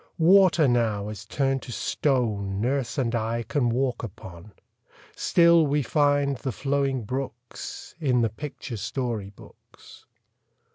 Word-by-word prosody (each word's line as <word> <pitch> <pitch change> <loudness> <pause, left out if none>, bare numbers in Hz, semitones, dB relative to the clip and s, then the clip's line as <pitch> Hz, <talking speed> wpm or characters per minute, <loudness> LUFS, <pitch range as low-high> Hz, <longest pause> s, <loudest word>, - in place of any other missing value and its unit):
Water 175 -2 +5
now 110 -4 +1
is 105 -3 -8
turned 135 -1 0
to 125 - -9
stone 110 -8 -1
Nurse 130 +4 -1
and 125 -3 0
I 115 0 -1
can 120 +2 0
walk 125 0 0
upon; 95 -2 -10 0.6
Still 170 -2 +4
we 145 +1 +1
find 145 +1 +2
the 130 - -3
flowing 135 -1 -1
brooks 125 +1 -6
In 130 -6 +2
the 115 - +2
picture 130 0 -7
story 115 -3 -3
books. 100 - -17
125 Hz, 130 wpm, -25 LUFS, 110-140 Hz, 0.6 s, Water